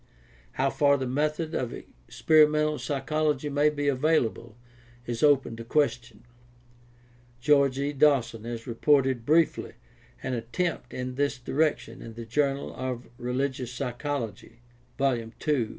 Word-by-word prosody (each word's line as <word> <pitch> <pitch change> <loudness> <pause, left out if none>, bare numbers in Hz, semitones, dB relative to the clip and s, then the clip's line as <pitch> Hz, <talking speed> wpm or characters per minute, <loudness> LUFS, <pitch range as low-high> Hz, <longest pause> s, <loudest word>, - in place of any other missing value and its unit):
How 135 +1 +1
far 140 -1 +3
the 130 - -3
methods 150 +5 -1
of 125 - -2
experimental 150 - +2
psychology 145 +2 -1
may 145 +1 +3
be 145 -1 -2
available 130 -5 0 0.5
is 120 -1 -4
open 140 -5 +3
to 115 - -7
question. 120 -4 -1 1.2
George 140 0 +3
E. 140 +1 -1
Dawson 135 -6 +2
has 115 -1 -5
reported 130 0 +2
briefly 160 +2 +2 0.5
an 130 - -2
attempt 125 +4 -3
in 125 0 -4
this 140 +1 0
direction 135 -2 -1
in 115 -1 -9
the 115 0 -7
Journal 140 +3 -1
of 125 -1 -5
Religious 125 0 -2
Psychology, 120 -3 -5 0.3
II 125 -5 0
(1913), - - -34
50 145 -5 +1
58). - - -12
135 Hz, 135 wpm, -27 LUFS, 120-150 Hz, 1.2 s, far